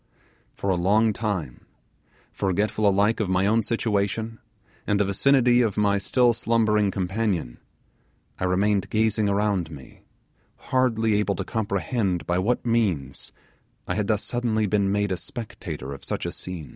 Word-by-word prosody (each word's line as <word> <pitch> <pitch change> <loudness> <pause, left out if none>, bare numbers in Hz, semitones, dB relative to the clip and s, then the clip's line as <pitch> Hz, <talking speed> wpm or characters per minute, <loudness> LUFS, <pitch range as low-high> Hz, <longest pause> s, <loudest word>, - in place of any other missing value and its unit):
For 100 - -1
a - - +2
long 105 +4 +3
time, 95 - -4 0.6
forgetful 100 +2 0
alike 100 +3 +2
of 105 -4 -1
my 95 +1 +2
own 110 +3 +3
situation, 110 0 -1 0.5
and 105 - +2
the 105 - +3
vicinity 125 +4 +3
of 110 -4 0
my 100 -1 +2
still 120 +4 +3
slumbering 110 -3 +2
companion, 95 - -2 0.8
I - - 0
remained 100 +2 +1
gazing 110 -1 +1
around 100 -4 0
me, 70 -5 -12 0.6
hardly 115 -4 +1
able 100 -1 0
to 95 - -3
comprehend 100 -2 -1
by 90 +1 0
what 120 +7 0
means 95 - -1 0.6
I - - -1
had 105 -2 -1
thus 105 -1 +1
suddenly 115 -3 0
been 100 -1 +1
made 105 0 0
a 95 - 0
spectator 85 - -7
of 70 - -10
such - - -4
a - - -2
scene. 90 -5 -6
105 Hz, 150 wpm, -25 LUFS, 95-110 Hz, 0.8 s, long